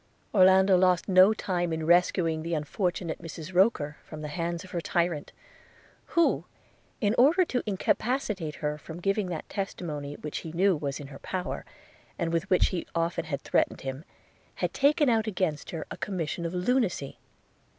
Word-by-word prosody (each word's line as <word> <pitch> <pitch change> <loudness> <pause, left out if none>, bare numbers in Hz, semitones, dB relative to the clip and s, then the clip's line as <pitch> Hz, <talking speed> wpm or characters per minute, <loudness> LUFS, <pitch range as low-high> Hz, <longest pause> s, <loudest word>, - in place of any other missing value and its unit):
Orlando 190 -1 +6
lost 180 -2 +3
no 190 +1 +7
time 175 -5 -1
in 160 -1 -2
rescuing 170 -1 +3
the 165 +1 -2
unfortunate 175 +2 -2
Mrs 165 +1 -8
Roker 175 -6 +2
from 155 -1 -9
the 150 - -4
hands 170 +2 -3
of 185 - -13
her 170 - -2
tyrant; 170 -3 -1 0.9
who, 335 - +3 0.6
in 205 -1 +2
order 325 +9 +5
to 250 -6 -1
incapacitate 205 - -1
her 150 0 -1
from 160 +2 -9
giving 195 +2 0
that 170 -3 -5
testimony 150 -7 -4
which 150 - -5
he 160 - -8
knew 190 +2 +3
was 140 -2 -3
in 145 - -7
her 135 - -10
power, 185 -1 -4 0.5
and 165 -2 -1
with 170 +3 -1
which 185 - +4
she 180 -3 -1
often 170 0 0
had 140 -3 -3
threatened - - 0
him, 135 +2 -5 0.5
had - - -2
taken 290 +1 +3
out 225 -2 +2
against 180 -7 -1
her 165 -2 -5
a - - -5
commission 170 -3 -3
of 170 - -6
lunacy. 185 - 0
175 Hz, 170 wpm, -28 LUFS, 160-195 Hz, 0.9 s, no